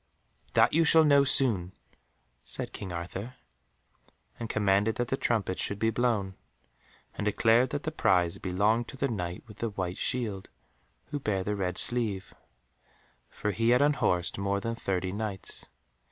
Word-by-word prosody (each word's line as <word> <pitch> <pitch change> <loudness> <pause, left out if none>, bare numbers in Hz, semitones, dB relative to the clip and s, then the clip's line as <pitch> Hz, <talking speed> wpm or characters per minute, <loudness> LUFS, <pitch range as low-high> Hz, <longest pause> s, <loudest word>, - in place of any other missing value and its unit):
"That - - +4
you 165 +2 +4
shall 160 0 +6
know 140 -2 +5
soon," 110 -10 +2 0.7
said - - -4
King 95 -3 -6
Arthur, 95 +8 -6 1.0
and 115 - -5
commanded 105 +1 +2
that 120 -1 -2
the - - +1
trumpets 110 -7 -1
should 100 - -2
be 110 +2 +1
blown, 110 -5 0 0.8
and - - -5
declared 115 +4 +3
that 145 0 -3
the 155 - -2
prize 90 - +2
belonged 105 +6 +1
to 135 - -9
the 140 - 0
Knight 90 -5 -4
with 105 -3 -14
the 115 - -2
white 95 -3 -4
shield, 110 -7 -2 0.6
who 145 - -2
bare 100 -8 -1
the 105 +2 -2
red 90 -3 -2
sleeve, 110 -6 +1 1.0
for 105 - -3
he 115 +3 +1
had 125 +3 +5
unhorsed 95 -13 +1
more 100 0 0
than 115 +2 -3
thirty 95 -5 -2
Knights. 100 -1 -5
105 Hz, 155 wpm, -29 LUFS, 95-120 Hz, 1.0 s, shall